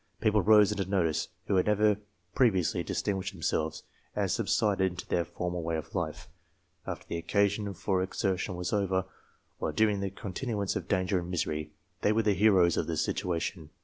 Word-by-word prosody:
People 105 -1 +3
rose 105 +1 +6
into 100 -3 -2
notice 85 -6 +1 0.2
who 95 - +1
had 90 - +2
never 105 0 +3 0.4
previously 95 -10 +2
distinguished 100 0 -2
themselves, 80 -2 -2 0.3
and - - 0
subsided 100 -4 +2
into 90 +1 -7
their 85 - +1
former 90 +1 -4
way 80 -1 -1
of 80 - -7
life, - - -3 0.6
after - - -5
the 85 - -3
occa 100 +4 +3
sion 100 0 -3
for 95 +2 0
exertion 95 0 -1
was 90 +3 -3
over; 95 -2 +1 0.5
while - - -1
during 105 -2 +2
the 100 0 -1
continuance 100 +1 -3
of - - -3
danger 95 -1 +1
and 85 0 -6
misery, 75 -3 -2 0.3
they 105 - +3
were 110 +1 +2
the 105 -1 +3
heroes 95 -3 +4
of - - 0
their - - -1
situa 85 -2 -1
tion. 80 -2 -5
95 Hz, 180 wpm, -30 LUFS, 90-105 Hz, 0.6 s, rose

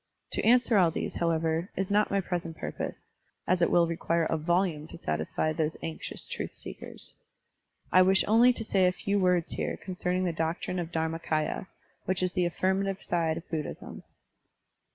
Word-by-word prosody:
To - - 0
answer 235 -2 +5
all 175 -3 +5
these, 165 - -3
however, 165 +1 0
is 190 +1 -2
not 210 +1 +3
my 200 - +1
present 170 -3 -4
purpose, - - -6 0.4
as 180 0 +2
it 170 - +4
will 170 -1 +5
require 165 0 0
a 160 - 0
voltmie 165 -1 0
to - - -8
satisfy 80 - -1
those 155 0 -1
anxious 160 - -5
truth - - -5
seekers. - - -8 0.8
I 185 - +7
wish 190 +1 +5
only 230 +4 +6
to 235 - -3
say 195 -4 +3
a - - +3
few 200 +2 -1
words 180 -2 +2
here - - -2
concerning 180 -1 -2
the 175 -2 0
doctrine 165 +3 -2
of 170 -1 -4
DharmaMya, 160 +1 -1 0.4
which 185 0 0
is 180 -1 0
the 180 - +2
affirmative 190 +2 0
side 165 -2 0
of 165 - -8
Buddhism. 155 -3 -5
175 Hz, 175 wpm, -29 LUFS, 160-190 Hz, 0.8 s, I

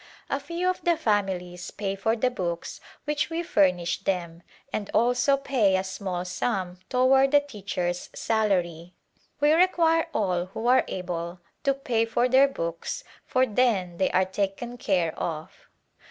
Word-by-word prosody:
A 275 - +1
few 340 +5 -3
of 370 - 0
the 340 -2 +2
families 185 -5 -1
pay 195 -1 -3
for 220 +4 0
the 250 +2 +1
books 170 -7 -4 0.2
which 295 +1 0
we 335 +1 -2
furnish 180 - +2
them 175 -3 -2 0.3
and 205 -2 -3
also 245 +4 +3
pay 245 -9 +2
a 185 - -1
small 185 -1 -4
sum 185 -2 -2
toward 265 +2 +4
the 290 +1 +6
teacher's 195 -10 -4
salary. 180 -6 0 0.4
We 295 +1 +4
require 330 -1 +3
all 180 - 0
who 210 +5 -6
are 255 +1 +5
able 175 -1 -4 0.3
to 275 -1 +3
pay 240 -4 0
for 240 +2 +1
their 265 +2 +6
books 170 -10 -4 0.2
for 255 0 +3
then 205 -7 +1
they 190 - +2
are 185 +1 +3
taken 200 +6 -3
care 180 -8 +1
of. 160 -2 -3
205 Hz, 155 wpm, -26 LUFS, 180-260 Hz, 0.4 s, the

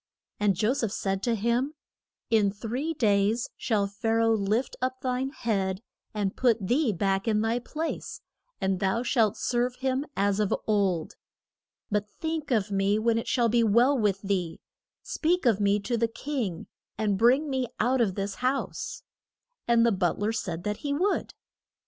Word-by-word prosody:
And 205 -2 +2
Jo 215 +7 +2
seph 230 -5 -1
said 195 -1 -2
to 235 +1 +1
him, 235 +7 0 0.6
In 210 -3 +4
three 245 +10 -3
days 215 -2 +2
shall 215 -5 0
Pha 205 +3 -4
ra 230 0 +3
oh 225 - +4
lift 215 +4 0
up 255 0 -1
thine 255 +1 -1
head, 200 -7 -2 0.3
and 205 -3 -2
put 240 -4 +3
thee 245 +6 +1
back 195 +2 0
in 215 -1 +2
thy 225 +2 +1
place, 315 +6 -5 0.4
and 190 -1 0
thou 195 +5 0
shalt 230 -5 +2
serve 245 0 0
him 265 +3 -1
as 200 0 +2
of 210 -2 +2
old. 195 -6 0 0.7
But 210 0 0
think 320 -2 -3
of 215 -5 +1
me 195 +1 +2
when 225 +1 +2
it - - -6
shall 240 -2 +2
be 235 +1 +3
well 235 +6 +4
with 205 -5 0
thee; 185 -4 -1 0.4
speak 345 0 0
of 225 -5 +4
me 205 0 +3
to 235 +3 -1
the 230 0 +2
king, 225 - -4 0.3
and 210 -2 +1
bring 250 +9 +4
me 260 -3 -1
out 250 +3 +2
of 195 -5 +1
this 200 0 -2
house. 260 +2 -2 0.6
And 235 -1 +4
the 235 - +4
but 185 -4 0
ler 210 +2 0
said 175 -6 -4
that 210 0 -2
he 285 -1 -3
would. 380 +7 0
225 Hz, 175 wpm, -27 LUFS, 200-250 Hz, 0.7 s, In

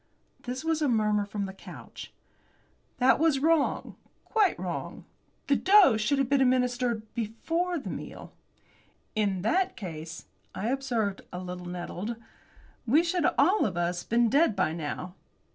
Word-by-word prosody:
This 255 +5 -5
was 325 -1 0
a 295 - +2
murmur 210 -4 +1
from 205 -1 -3
the 190 - -7
couch. 195 - -11 0.9
"That 260 +2 +4
was 315 -3 +3
wrong 315 +1 +1 0.3
quite 430 -4 +2
wrong. - - -5 0.4
The 280 - +3
dose 375 - +5
should 280 +7 +1
have 270 -2 +1
been 275 +1 +2
administered 250 -3 +1
before 330 +11 -2
the 285 - -5
meal." - - -8 0.8
"In 200 -4 0
that 365 - +1
case," 165 -5 -7 0.3
I 195 +5 -2
observed, 240 -7 -1
a - - -6
little 180 0 -6
nettled, 180 +5 -5 0.7
"we 295 +8 +5
should 345 -1 +1
all 365 +10 +4
of 185 -5 -1
us 175 +1 -1
been 235 +1 +2
dead 280 -1 +3
by 180 -5 +1
now." 170 +3 -5
235 Hz, 145 wpm, -28 LUFS, 195-285 Hz, 0.9 s, dose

